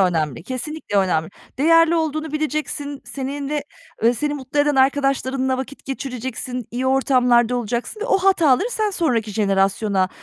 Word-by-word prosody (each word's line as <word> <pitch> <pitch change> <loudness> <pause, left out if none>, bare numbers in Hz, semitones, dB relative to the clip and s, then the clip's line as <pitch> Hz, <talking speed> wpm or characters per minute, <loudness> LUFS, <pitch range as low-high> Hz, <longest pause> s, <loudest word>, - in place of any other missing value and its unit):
önemli, 160 -6 0
kesinlikle 260 - -4
önemli. 170 -4 +1 0.3
Değerli 330 +3 +5
olduğunu 310 -1 -2
bileceksin, 300 -2 -3
seninle, 280 +2 -4 0.4
eee, 235 +2 +4
seni 295 +5 -1
mutlu 275 0 -5
eden 290 0 +2
arkadaşlarınla 265 -1 +1
vakit 265 +2 -7
geçireceksin, 255 -2 -5
iyi 250 +2 -2
ortamlarda 250 -2 +3
olacaksın 240 - -3
ve - - -2
o - - +2
hataları 370 - +3
sen 430 -3 0
sonraki 250 - 0
jenerasyona, 195 -1 +1
265 Hz, 135 wpm, -21 LUFS, 235-300 Hz, 0.4 s, Değerli